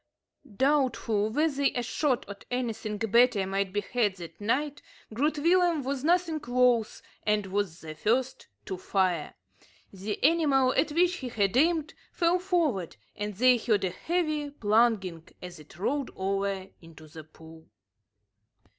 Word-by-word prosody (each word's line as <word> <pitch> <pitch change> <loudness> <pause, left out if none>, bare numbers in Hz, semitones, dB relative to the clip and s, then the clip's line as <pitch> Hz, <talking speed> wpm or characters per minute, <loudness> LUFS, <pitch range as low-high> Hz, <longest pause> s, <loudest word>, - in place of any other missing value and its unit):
Doubtful 255 -7 +1
whether 280 +2 +1
a 245 - -1
shot 265 +1 -1
at 200 0 -9
anything 230 -4 -3
better 225 -1 +3
might 195 0 -1
be 205 +1 -1
had 210 -2 0
that 175 +2 -11
night, 285 +7 -1 0.3
Groot 295 +7 0
Willem 340 0 +3
was 270 0 -3
nothing 335 -1 +1
loath, 245 -2 +2 0.2
and 210 -1 0
was 195 -3 -3
the 155 -1 -7
first 245 +11 -1 0.2
to 190 - -4
fire. 180 -4 -1 0.6
The 200 +2 -4
animal 280 -4 +3
at 315 - +1
which 355 +3 +2
he 260 -7 -6
had 200 -3 0
aimed 315 +2 +2 0.2
fell 345 0 +2
forward, 330 - 0 0.2
and 205 -1 -4
they 250 +4 +5
heard 215 -4 0
a 185 - 0
heavy 310 - -2
plunging, 210 - +1
as 180 -2 -9
it 150 +1 -15
rolled 275 +8 -1
over 195 0 -2
into 165 -2 -14
the 155 +1 -11
pool. 160 +1 -16
235 Hz, 145 wpm, -28 LUFS, 195-290 Hz, 0.6 s, they